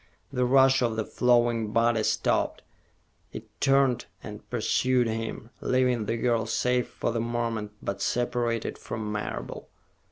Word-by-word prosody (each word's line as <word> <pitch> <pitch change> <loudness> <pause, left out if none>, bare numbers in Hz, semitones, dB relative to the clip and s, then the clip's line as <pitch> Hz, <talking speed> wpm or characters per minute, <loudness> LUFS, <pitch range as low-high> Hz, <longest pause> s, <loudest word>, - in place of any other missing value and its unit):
The 125 -1 +1
rush 135 +1 +5
of 115 -2 +1
the 110 -1 -2
flowing 120 -3 +2
body 115 -1 +3
stopped; - - 0 0.7
it - - -7 0.2
turned 135 -3 +3 0.2
and - - -9
pursued 130 -1 +1
him, 115 +1 -4
leaving 125 -4 +1
the 115 - 0
girl 115 -2 +1
safe 125 +2 +1
for - - -2
the 115 0 -1
moment, 115 -3 -2
but 100 - -3
separated 120 -2 -1
from 110 -2 -5
Marable. - - -5
120 Hz, 135 wpm, -27 LUFS, 110-125 Hz, 0.7 s, rush